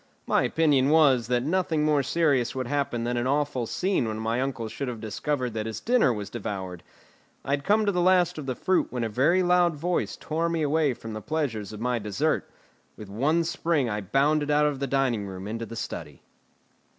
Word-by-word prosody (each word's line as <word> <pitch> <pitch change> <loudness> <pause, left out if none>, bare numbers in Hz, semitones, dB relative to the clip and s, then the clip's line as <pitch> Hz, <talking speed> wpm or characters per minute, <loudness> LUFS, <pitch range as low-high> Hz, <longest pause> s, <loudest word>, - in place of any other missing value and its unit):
My - - +2
opinion 145 -4 +2
was, 140 -7 +4
that 125 0 +1
nothing 160 -1 0
more 150 -2 +3
serious 135 -4 +1
would 130 -1 -2
happen 135 -3 -1
than 120 +1 -1
an 120 +1 0
awful 140 -4 0
scene 185 - 0
when 110 0 -3
my 115 +3 -1
uncle 130 -4 -3
should 130 +5 -5
have 120 -3 -5
discovered 125 +3 -2
that 110 0 -3
his 110 - -5
dinner 235 - +3
was 105 -3 -5
devoured. 95 -6 -5 0.6
I - - -3
had 140 0 0
come 210 +4 +3
to 200 - +2
the 180 -2 0
last 180 -2 +3
of 140 - -7
the 130 - -2
fruit 185 +7 +1
when 125 -2 -3
a 115 - -1
very 155 - +3
loud 175 -2 +3
voice 175 +4 -2
tore 165 +2 -1
me 165 -2 -1
away 150 -3 +1
from 115 -1 -8
the 110 - -5
pleasures 115 -6 -2
of 105 0 -8
my 125 0 0
dessert. 105 -2 -1 0.5
With 105 - -10
one 145 +11 +1
spring 160 -6 0
I 105 0 -2
bounded 145 +8 +1
out 150 0 +4
of 145 -2 -1
the 140 - -2
dining 125 -6 0
room 95 0 -7
into 115 +1 -4
the 115 - -8
study. - - -6
135 Hz, 210 wpm, -26 LUFS, 115-155 Hz, 0.6 s, was